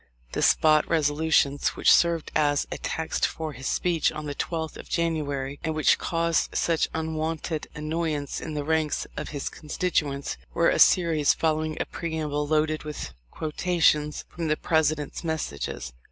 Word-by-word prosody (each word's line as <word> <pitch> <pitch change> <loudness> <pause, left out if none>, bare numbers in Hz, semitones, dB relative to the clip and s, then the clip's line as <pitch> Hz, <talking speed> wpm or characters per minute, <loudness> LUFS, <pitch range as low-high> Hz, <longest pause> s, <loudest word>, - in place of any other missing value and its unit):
The - - -2
"Spot 155 -1 +5
Resolutions," 150 -2 +2
which - - +5
served 170 -2 +2
as 145 -2 +2
a - - -4
text 160 0 -3
for 160 -2 -5
his 130 +1 -6
speech 175 -3 +1
on 155 -1 -6
the 145 - -3
12th 160 +1 -3
of - - -11
January, 145 -5 -1
and 160 -1 -1
which 155 - +3
caused 170 -1 0
such 165 -2 +1
unwonted 160 0 -2
annoy 155 +1 -1
ance 145 -1 -4
in 155 -1 -5
the 145 - -2
ranks 160 0 0
of - - -5
his 145 -2 -4
constituents, 150 -3 -2 0.2
were 170 - +4
a - - +1
series 165 -5 +5
following 155 -1 0
a - - 0
preamble 155 -3 -3
loaded 155 0 +1
with 150 - -6 0.2
quotations 155 - +1
from 170 -2 -4
the 155 0 +1
President's 155 -2 0
messages. 70 - -4
155 Hz, 155 wpm, -26 LUFS, 150-160 Hz, 0.2 s, Spot